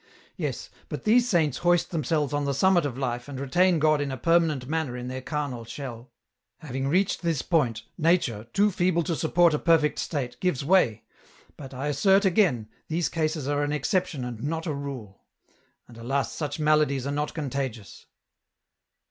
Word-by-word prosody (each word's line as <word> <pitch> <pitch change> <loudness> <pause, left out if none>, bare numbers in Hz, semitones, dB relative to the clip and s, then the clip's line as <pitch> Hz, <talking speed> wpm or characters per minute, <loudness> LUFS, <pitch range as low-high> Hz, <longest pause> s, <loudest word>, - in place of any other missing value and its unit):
Yes, - - -4 0.2
but - - -5
these 240 +3 +4
saints 160 - +1
hoist 175 0 +2
themselves 150 -2 -1
on 145 0 0
the 140 -1 -1
summit 175 0 +3
of 130 -3 -7
life 120 -2 -3
and 140 -2 -6
retain 175 +6 +2
God 155 -1 +3
in 145 - -2
a 130 - -4
permanent 160 -3 +2
manner 155 -5 -2
in 125 0 -5
their 130 0 -5
carnal 140 -4 -4
shell. 120 0 -8 0.5
Having 135 -4 -4
reached 185 +7 +1
this 165 -5 -1
point, 120 - +1 0.2
nature, 155 - +1
too 205 - +3
feeble 175 -1 +1
to 170 0 -1
support 170 +1 +3
a 150 - 0
perfect 160 -3 +3
state, 135 -6 -3
gives 165 -7 -1
way, 165 - +3 0.5
but, 135 -2 -10
I 135 +1 -5
assert 190 +8 +3
again, 170 - +2 0.2
these 165 +1 -1
cases 155 -3 -2
are 145 0 0
an 145 0 -1
exception 150 - -1
and 120 -2 -6
not 160 +3 -3
a 155 - -2
rule. 135 -8 -7 0.7
And, 115 -1 -14
alas, 135 +4 -1
such 145 -2 -4
maladies 150 -3 +2
are 140 - -2
not 150 +1 -2
contagious. 135 -8 -5
145 Hz, 175 wpm, -26 LUFS, 130-170 Hz, 0.7 s, these